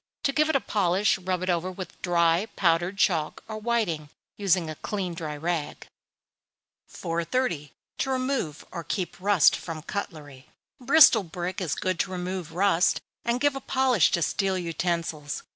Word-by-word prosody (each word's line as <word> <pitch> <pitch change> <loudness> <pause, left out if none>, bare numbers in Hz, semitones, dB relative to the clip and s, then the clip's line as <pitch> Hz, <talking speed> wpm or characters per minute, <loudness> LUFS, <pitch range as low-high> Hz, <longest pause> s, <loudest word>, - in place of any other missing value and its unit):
To 275 - +2
give 305 +2 +2
it 315 - +1
a - - +5
polish, 195 0 +1
rub 185 -1 -2
it 185 - -2
over 175 +2 -1
with 185 -2 -9
dry 170 +2 +2
powdered 175 +2 +1
chalk 165 -6 +1
or 215 -1 -5
whiting, 210 -10 -1 0.3
using 185 -4 +1
a 155 - -4
clean 185 +1 -4
dry 155 -3 -5
rag. 160 -1 -3 1.0
430. 165 - -2 0.3
To - - 0
remove 255 - -2
or 170 -2 -5
keep 180 +2 -4
Rust 200 -5 +5
from 160 -3 -7
Cutlery. 150 -9 -6 0.3
Bristol 265 -3 +7
brick 180 +1 -5
is 165 -5 -1
good 185 -2 -2
to 185 - 0
remove 180 -2 -4
rust, 180 -1 +3 0.2
and 235 +1 0
give 290 +1 +2
a 270 - -5
polish 255 - +3
to 170 - +2
steel 195 +2 0
utensils. 165 -3 -3
180 Hz, 160 wpm, -26 LUFS, 165-205 Hz, 1.0 s, Bristol